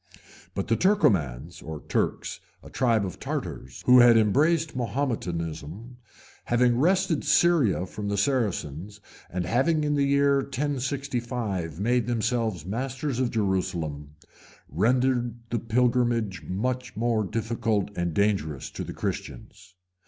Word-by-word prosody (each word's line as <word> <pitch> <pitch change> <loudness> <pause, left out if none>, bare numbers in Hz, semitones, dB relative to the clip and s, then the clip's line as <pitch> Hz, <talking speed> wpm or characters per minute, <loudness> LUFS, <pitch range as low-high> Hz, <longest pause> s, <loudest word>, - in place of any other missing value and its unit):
But 100 - -2
the 115 - +3
Turcomans 85 - +1
or 80 -1 -6
Turks, - - -1 0.2
a - - -12
tribe 115 -5 +2
of 90 - -7
Tartars, 65 0 -5
who 125 0 +8
had 120 -1 +7
embraced 150 +9 +2
Mahometanism, 105 - -3 0.5
having 120 0 +2
wrested 180 0 +2
Syria 145 - +3
from 100 +2 -6
the 100 - -1
Saracens, 100 - -1 0.3
and 90 0 -3
having 155 +6 +2
in 150 0 +1
the 145 - +1
year 140 0 +3
1065 125 - -3
made 120 +2 +1
themselves 115 - -1
masters 130 +5 -3
of 130 -2 +1
Jerusalem, 90 -9 -2 0.5
rendered 120 - +1 0.2
the 120 - 0
pilgrimage 115 -5 +1
much 125 +5 -2
more 115 0 +1
difficult 110 -1 -1
and 85 -2 -2
dangerous 95 -9 0
to - - -5
the - - -7
Christians. 100 -4 -6
115 Hz, 125 wpm, -26 LUFS, 95-130 Hz, 0.5 s, who